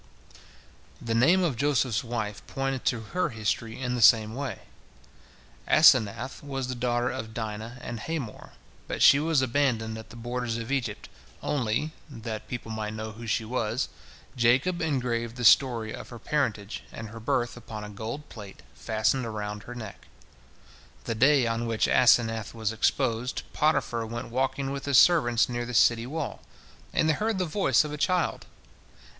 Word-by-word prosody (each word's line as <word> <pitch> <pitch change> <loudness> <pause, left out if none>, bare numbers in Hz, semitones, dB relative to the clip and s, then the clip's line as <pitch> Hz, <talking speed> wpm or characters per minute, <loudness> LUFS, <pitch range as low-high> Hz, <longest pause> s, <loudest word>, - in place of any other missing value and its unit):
The 115 - -3
name 165 +11 +4
of 160 -7 0
Joseph's 130 -4 +1
wife 110 -5 -4
pointed 135 -1 -3
to 115 - +1
her 180 - +1
history 110 0 -3
in 125 -1 -2
the 125 - -2
same 110 +1 +6
way. 135 +2 -5 1.1
Asenath 130 -5 +4
was 135 -2 -4
the 130 - -3
daughter 120 0 0
of 110 -4 -6
Dinah 110 +1 -5
and 120 -2 -6
Hamor, 140 -4 -5 0.3
but - - -1
she 140 - +8
was 155 -3 +2
abandoned 115 -4 0
at 110 - -12
the - - -12
borders 120 0 -3
of 115 +3 -5
Egypt, 120 -7 -2 0.4
only, 145 0 -1 0.2
that 115 -4 -6
people 120 -2 -6
might 110 -1 -4
know 110 0 -5
who 115 +2 -9
she 110 +1 0
was, 115 +1 -1 0.5
Jacob 130 +9 +2
engraved 120 -6 -1
the 125 -1 -3
story 115 0 +4
of - - -8
her 120 - -9
parentage 115 -7 -2
and 115 -1 -7
her 115 +1 -9
birth 120 +2 -1
upon 115 -3 -8
a 105 - -7
gold 115 +8 -6
plate 100 -8 -11
fastened 110 - 0
around 105 -1 -5
her 120 +5 -9
neck. 110 -5 -9 1.0
The - - -2
day 130 +3 +4
on 115 0 -1
which 115 -1 +1
Asenath 115 -3 +3
was 110 -1 -1
exposed, 120 +2 0
Potiphar 120 -7 +1
went 120 +2 -6
walking 135 +2 -1
with 140 0 -5
his 140 -2 +3
servants 120 -10 +5
near 120 -1 -3
the 125 - -5
city 115 +1 +4
wall, 150 -1 -4 0.5
and 155 - +2
they 160 - +4
heard 215 +6 -1
the 185 - 0
voice 185 +2 +2
of 150 -1 -6
a - - -4
child. 180 -2 0
120 Hz, 165 wpm, -27 LUFS, 110-135 Hz, 1.1 s, she